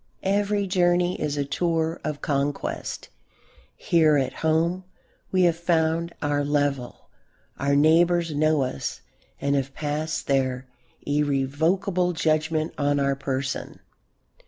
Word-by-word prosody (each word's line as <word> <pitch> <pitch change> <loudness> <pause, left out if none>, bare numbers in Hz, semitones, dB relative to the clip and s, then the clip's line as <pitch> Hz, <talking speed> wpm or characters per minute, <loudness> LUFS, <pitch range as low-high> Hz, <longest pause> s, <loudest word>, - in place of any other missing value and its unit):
Every 205 +1 +1
journey 180 -1 +1
is 150 -1 -1
a 140 - 0
tour 165 +2 -1
of 150 -1 -4
conquest. 140 0 -2 0.7
Here 155 -3 +3
at 130 -2 -1
home 165 +3 +1 0.5
we 185 -1 +3
have 170 -2 +4
found 170 -1 +1
our 145 0 +1
level; 145 -3 -2 0.5
our 140 0 +1
neighbours 165 +2 +3
know 155 -1 +2
us 125 - -4 0.4
and 140 0 0
have 135 0 -2
passed 155 +1 -3
their 130 -2 0 0.4
irrevocable 150 +6 +1
judgment 155 0 0
on 145 0 +2
our 140 0 +1
person. 135 0 -4
155 Hz, 115 wpm, -25 LUFS, 140-170 Hz, 0.7 s, have